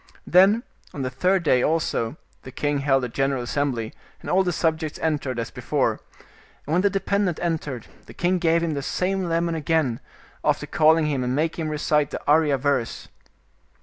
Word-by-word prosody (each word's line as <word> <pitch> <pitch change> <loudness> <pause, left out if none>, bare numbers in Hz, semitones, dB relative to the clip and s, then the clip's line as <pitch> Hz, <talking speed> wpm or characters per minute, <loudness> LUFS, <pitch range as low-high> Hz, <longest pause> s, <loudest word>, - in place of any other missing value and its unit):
Then 195 +6 +5 0.3
on 140 - -3
the 130 - -3
third 180 +7 +1
day 130 -5 +3
also 155 -5 0 0.2
the 130 - -10
king 145 +2 -1
held 135 -2 +2
a - - -1
general 135 +1 -1
assem 140 +3 0
bly, 115 -3 -4 0.3
and - - -6
all 185 - +4
the 180 -2 0
subjects 160 -2 -1
entered, 145 -5 -1
as 115 - -3
before, - - -1 0.7
and 150 - -3
when 180 - +3
the 200 - +3
dependent 195 -2 0
entered, 150 -8 -3 0.2
the - - -12
king 180 +1 +1
gave 170 0 +2
him 165 -2 -1
the 140 - -2
same 185 +4 -1
lemon 170 0 0
again, 155 -6 0 0.4
after - - +1
calling 160 +1 +3
him 140 -4 -1
and 125 +1 -1
making 160 +2 -1
him - - -3
recite 150 -1 +1
the - - -5
Arya 150 -1 +4
verse. 135 -3 -1
155 Hz, 185 wpm, -24 LUFS, 135-170 Hz, 0.7 s, Then